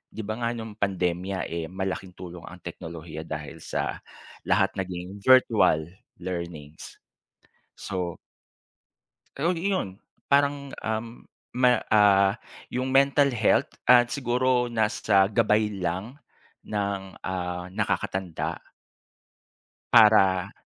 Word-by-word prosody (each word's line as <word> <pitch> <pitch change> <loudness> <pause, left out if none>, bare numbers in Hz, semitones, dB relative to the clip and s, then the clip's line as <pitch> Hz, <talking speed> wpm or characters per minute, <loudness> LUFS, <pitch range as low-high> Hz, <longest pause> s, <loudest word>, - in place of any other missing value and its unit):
'Di 110 - -4
ba 110 +3 -4
nga 120 0 -1
nung 110 -2 -7
pandemya 90 0 -1
eh 85 -1 -3
malaking 95 0 -5
tulong 90 -1 -9
ang 90 -1 -12
teknolohiya 80 -2 -8
dahil 75 +1 -6
sa - - -3 0.5
lahat - - +3
naging 90 +1 -5
virtual 105 -9 +4 0.2
learnings. 85 -4 -7 0.8
So 90 -3 -4 1.2
Ay 170 +5 0
iyon. 100 - -3 0.2
Parang 140 0 +1
ah, 110 0 -1 0.6
ma 125 0 +4 0.2
ah, 100 -2 +5 0.4
yung 130 +1 -2
mental 140 +1 +4
health 115 -4 +2 0.2
at 120 -1 +6
siguro 125 -1 +1
nasa 105 -4 +2
gabay 105 -1 +2
lang 95 +9 -3 0.5
ng 100 -2 -2 0.2
ah, 90 -1 -4
nakakatanda. 95 -2 -2 1.3
Para 105 -5 +5
100 Hz, 100 wpm, -26 LUFS, 90-120 Hz, 1.3 s, at